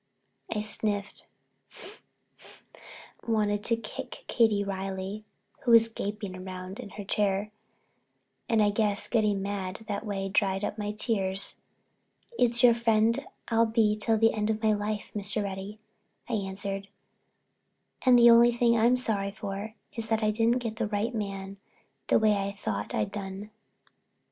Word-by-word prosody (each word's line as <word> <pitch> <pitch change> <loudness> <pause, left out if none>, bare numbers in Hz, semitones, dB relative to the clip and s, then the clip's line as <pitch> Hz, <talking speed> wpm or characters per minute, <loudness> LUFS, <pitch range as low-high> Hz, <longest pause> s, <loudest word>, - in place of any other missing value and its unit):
I 210 - -1
sniffed, 210 -1 -3 2.0
wanting 210 -2 +1
to 230 +2 +2
kick 250 +3 -8
Katie 220 -4 +3
Reilly, 195 +1 -4 0.3
who 245 - -4
was 230 -1 +7
gaping 205 -4 -5
round 185 +2 -7
in 235 -5 -7
her 205 - -5
chair, 205 +1 0 1.0
and 220 -2 +4
I 205 - +3
guess 205 -1 0
getting 210 -4 +1
mad 200 +1 -4
that 200 - -3
way 195 -3 -3
dried 195 0 +1
up 215 - -5
my 205 0 -2
tears. 200 -3 0 0.8
"It's 240 -1 +3
your 240 -1 +8
friend 230 +2 +2 0.3
I'll 230 0 +3
be 220 -2 +2
till 220 +1 +1
the 225 +1 +4
end 210 0 -1
of 220 0 -1
my 215 -1 +4
life, 210 0 -3
Mr. 205 +1 +1
Reddy," 195 +1 -6 0.5
I 245 - -4
answered. 195 -1 -3 1.2
"And 255 -2 +6
the 235 0 +8
only 235 +1 +7
thing 235 0 +2
I'm 235 +3 +4
sorry 205 -5 -1
for 205 +1 -6 0.2
is 230 -1 -4
that 220 0 +1
I 215 - +3
didn't 230 +3 +1
get 220 -2 -4
the 230 -2 -1
right 210 +3 -1
man 195 -2 -5 0.5
the - - +4
way 215 -1 +4
I 200 0 -2
thought 105 - -4
I'd 105 - -1
done." 200 +1 -6
210 Hz, 150 wpm, -28 LUFS, 200-225 Hz, 2.0 s, your